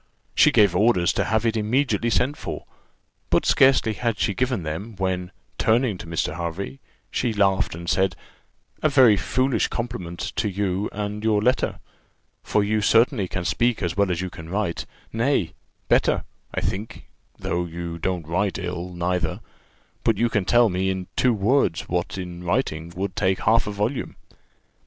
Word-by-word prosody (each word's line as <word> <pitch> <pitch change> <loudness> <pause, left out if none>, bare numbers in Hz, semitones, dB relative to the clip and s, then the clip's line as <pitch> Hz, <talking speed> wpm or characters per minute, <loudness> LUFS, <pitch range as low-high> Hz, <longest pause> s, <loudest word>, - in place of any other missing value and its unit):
She - - +5
gave 100 -4 +4
orders 90 -3 +3
to - - 0
have 110 +1 +1
it 115 -1 +1
immediately 115 +1 +1
sent 130 +5 +1
for; - - -6 0.6
but - - +2
scarcely 130 -4 +4
had 115 0 -1
she 100 - 0
given 125 -2 -1
them, 85 +9 -5
when, 90 -1 -2 0.3
turning 115 -3 +2
to - - -8
Mr. 80 -1 -2
Hervey, 85 +9 -4 0.3
she 120 -3 0
laughed 95 -5 +2
and 85 +1 -8
said, 95 -1 +2 0.7
"A 155 - +3
very 130 -7 +6
foolish 130 +3 +1
compliment 95 -8 -5 0.2
to 105 - +1
you 100 0 -1
and 105 +1 -4
your 110 -2 +3
letter, 125 +5 +1 0.6
for 105 - +1
you 105 +1 +1
certainly 115 0 +3
can 90 0 -4
speak 120 +5 +1
as 85 -1 -1
well 100 -1 +2
as 90 -1 -1
you 95 -1 -4
can 80 +1 -10
write; 95 -3 -2 0.3
nay, 115 - +1 0.3
better, - - +3 0.3
I - - -2
think 105 +4 -4 0.3
though 85 0 -2
you 85 0 -6
don't 90 -1 -2
write 95 +4 0
ill, 90 0 -4
neither 90 +1 -1 0.6
but 115 - +2
you 120 - +2
can 105 -5 0
tell 120 +3 +5
me, 95 +1 0
in 95 -1 -3
two 125 - +3
words, 105 -3 +2
what 90 +2 -2
in 90 -1 -6
writing 85 -5 -1
would 95 0 -3
take 95 -1 +1
half 115 -1 +3
a - - -2
volume. 105 +6 -2
100 Hz, 170 wpm, -24 LUFS, 90-115 Hz, 0.7 s, very